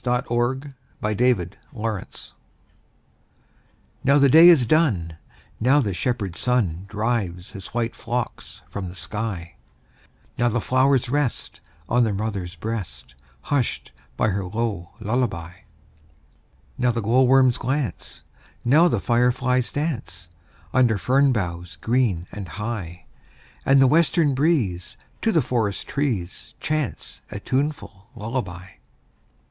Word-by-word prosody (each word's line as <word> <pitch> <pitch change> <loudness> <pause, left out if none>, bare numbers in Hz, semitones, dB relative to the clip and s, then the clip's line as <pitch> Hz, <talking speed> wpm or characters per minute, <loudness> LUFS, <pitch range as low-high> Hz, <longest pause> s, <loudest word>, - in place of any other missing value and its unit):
Louisa 125 +1 0 0.4
May 105 - -1
Alcott 105 -5 +1 0.2
Lullaby 110 -4 -5 1.8
NOW 140 +2 +5
the 140 -1 +5
day 160 +5 +9
is 150 -8 +6
done, 110 - +2 0.4
Now 130 +5 +4
the 105 -8 0
shepherd 100 -3 -2
sun 100 -8 0
Drives 105 -5 -2
his 95 -1 -9
white 115 -1 -2
flocks 120 0 -5
from 95 -3 -5
the 90 - -11
sky; 100 -4 -5 0.8
Now 120 0 +3
the 120 +1 0
flowers 130 +2 +2
rest 140 -2 -2 0.3
On 120 +1 +3
their 110 -3 0
mother's 100 -4 -3
breast, 80 - -6 0.3
Hushed 135 - -1 0.3
by 110 - +2
her 100 0 -1
low 100 -2 -3
lullaby. 110 -7 -2 1.3
Now 125 0 +3
the 115 -1 0
glowworms 130 +3 +4
glance, 135 0 -3 0.4
Now 155 +8 +6
the - - +1
fireflies 125 +1 +1
dance, 95 - -4 0.4
Under 125 -5 +4
fern 135 +6 +3
boughs 90 -6 -3
green 110 -1 0
and 100 -2 -7
high; 95 -2 -5 0.6
And 135 0 +6
the 135 - +7
western 155 +1 +3
breeze 130 - 0 0.2
To 225 - +2
the 160 -7 +3
forest 115 -6 -1
trees 115 -11 -3
Chants 125 - -3
a 100 - -6
tuneful 130 -6 -3
lullaby. 105 -6 -4
115 Hz, 120 wpm, -23 LUFS, 95-130 Hz, 1.8 s, day